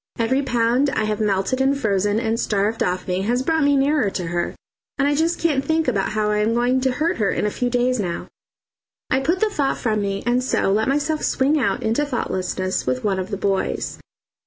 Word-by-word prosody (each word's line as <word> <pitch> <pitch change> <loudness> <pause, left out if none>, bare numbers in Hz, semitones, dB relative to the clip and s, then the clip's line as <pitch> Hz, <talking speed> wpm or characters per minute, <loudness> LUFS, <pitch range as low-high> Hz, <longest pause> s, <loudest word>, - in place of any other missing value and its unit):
Every 245 +4 +1
pound 245 +1 +1
I 220 - -1
have 215 0 -1
melted 205 +5 0
and 275 +1 +2
frozen 205 -2 +1
and 230 -1 -1
starved 210 +1 0
off 180 0 -1
me 180 0 -1
has 240 +5 0
brought 320 +1 +1
me 285 0 +4
nearer 275 -5 +2
to 185 -2 -4
her, 175 0 -2 0.4
and 280 0 +2
I 290 - +2
just 325 +3 +1
can't 295 -5 +1
think 320 +1 0
about 205 -6 0
how 210 -1 0
I 210 - +1
am 220 +2 +1
going 250 +2 +2
to 260 -1 +1
hurt 320 +6 0
her 205 -3 +1
in - - -1
a 210 - 0
few 245 +3 -1
days 245 0 +1
now. 175 -4 -3 0.8
I 260 - +3
put 335 +7 0
the 435 - +3
thought 280 -7 0
from 215 -3 0
me, 200 0 -2
and 245 +1 +1
so 250 - +1
let 215 +2 +1
myself 295 +3 0
swing 285 +4 +2
out 250 - 0
into 225 +6 +1
thoughtlessness 185 - -2
with 130 0 -1
one 195 -2 0
of 185 +1 -4
the 200 - -3
boys. 195 -1 -1
240 Hz, 225 wpm, -21 LUFS, 205-275 Hz, 0.8 s, me